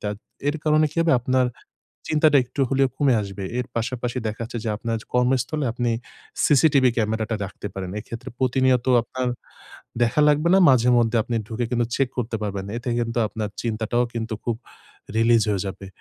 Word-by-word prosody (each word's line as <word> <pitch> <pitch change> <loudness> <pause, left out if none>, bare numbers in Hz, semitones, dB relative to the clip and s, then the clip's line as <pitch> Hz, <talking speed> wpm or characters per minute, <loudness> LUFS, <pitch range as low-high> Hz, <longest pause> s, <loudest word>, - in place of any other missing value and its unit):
তা 105 - -2 0.4
এর 145 - 0
কারণে 155 0 +4
কি 150 - -17
হবে? 165 -3 +3
আপনার 130 +1 +2 0.7
চিন্তাটা 155 -1 +5
একটু 135 - -4
হলেও 135 -1 +2
কমে 140 -3 +3
আসবে। 100 -1 -6 0.2
এর 125 - -1
পাশাপাশি 120 +1 -2
দেখা 110 +2 -5
যাচ্ছে 115 +1 -6
যে 115 - -2
আপনার 115 +1 -2 0.2
কর্মস্থলে 125 +4 +1
আপনি 120 0 -1 0.6
সিসিটিভি 140 -2 +5
ক্যামেরাটা 110 0 0
রাখতে 105 +1 -7
পারেন। 95 -2 -5
এক্ষেত্রে 115 +2 -8
প্রতিনিয়ত 130 -1 +2 0.2
আপনার 130 +2 -4 0.8
দেখা 120 +5 +2
লাগবে 150 +3 +3
না। - - +6
মাঝে 125 -2 +4
মধ্যে 115 0 +2
আপনি 120 - -4
ঢুকে 115 +2 -2
কিন্তু 120 -1 +1
চেক 135 -2 +1
করতে 115 -1 -1
পারবেন। 100 -2 -3
এতে 120 +1 -5
কিন্তু 115 0 -2
আপনার 110 0 -4
চিন্তাটাও 115 +1 0
কিন্তু 115 -1 -3
খুব 120 -2 -1 0.6
release 115 0 +4
হয়ে 100 -2 0
যাবে। 95 0 -7
120 Hz, 170 wpm, -23 LUFS, 110-130 Hz, 0.8 s, না